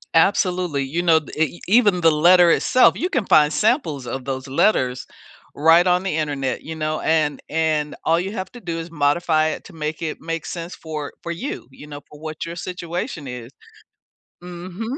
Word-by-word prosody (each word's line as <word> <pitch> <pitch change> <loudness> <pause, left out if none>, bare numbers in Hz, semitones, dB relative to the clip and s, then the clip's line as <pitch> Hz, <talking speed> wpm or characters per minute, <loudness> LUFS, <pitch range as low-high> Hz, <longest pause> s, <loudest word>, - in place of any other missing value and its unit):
Absolutely. 180 -3 +2
You 160 +6 -2
know, 165 -2 +5
d 155 - -13
e 160 +2 0
even 205 -3 +4
the 165 - +5
letter 175 +3 +6
itself, 255 +8 +4
you 355 - -1
can 255 - -1
find 150 -3 +5
samples 155 - 0
of 130 +1 -4
those 130 0 -4
letters 130 -3 +1 0.5
right 165 +4 +5
on 180 0 +2
the 190 -5 -2
internet, 145 -4 -2
you 160 - -6
know? 155 0 -2
And 155 -2 +1
and 155 -1 0
all 165 - +3
you 190 +3 -3
have 190 -4 -5
to 245 - -11
do 170 -2 -4
is 165 +1 -7
modify 155 +1 +1
it - - -6
to - - -13
make 155 -1 -4
it 160 -2 -4
make 165 -1 -4
sense 170 0 -6
for 155 -3 -6
for 170 - -5
you, 255 +12 -6
you 145 - -13
know, 145 -1 -8
for 150 - -13
what 155 +1 -6
your 170 0 -6
situation 175 - -5
is. 125 -1 -8 0.9
Mhm. 180 +4 -7
160 Hz, 190 wpm, -21 LUFS, 150-180 Hz, 0.9 s, letter